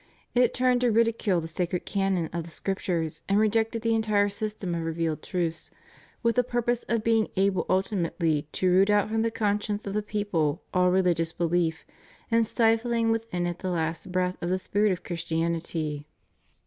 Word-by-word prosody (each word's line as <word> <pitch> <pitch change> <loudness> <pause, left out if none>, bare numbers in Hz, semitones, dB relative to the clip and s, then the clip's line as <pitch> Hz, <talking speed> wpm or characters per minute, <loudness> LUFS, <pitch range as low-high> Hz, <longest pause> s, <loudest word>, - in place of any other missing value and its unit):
It 245 0 +3
turned 250 -1 +2
to 245 - +3
ridicule 225 -5 +2
the 165 - -5
sacred 175 +2 -2
canon 195 -4 0
of 170 -1 -2
the 170 - -11
Scriptures 170 -3 -3
and 200 - +3
rejected 220 +1 +1
the 230 0 +2
entire 215 -2 +2
system 210 -3 -4
of 170 - -2
revealed 165 -1 -2
truths, 170 -2 -3 0.5
with 235 +1 +2
the 250 - +5
purpose 240 0 0
of 230 -2 +1
being 225 -1 +3
able 195 -1 +2
ultimately 170 -5 0
to 185 - 0
root 190 +3 +5
out 205 0 +3
from 220 0 0
the 230 - +1
conscience 210 -1 -1
of 200 - -4
the 210 - 0
people 205 -8 -1
all 180 0 +4
religious 175 -3 +1
behef 170 -1 +1 0.6
and 230 -1 +3
stifling 230 0 +2
within 225 -6 -1
it 175 0 -3
the 185 - -3
last 165 +1 -2
breath 180 0 0
of 175 - -2
the 185 - +1
spirit 205 +2 +1
of 180 -1 -3
Christianity. 165 -3 -2
195 Hz, 175 wpm, -27 LUFS, 170-220 Hz, 0.6 s, the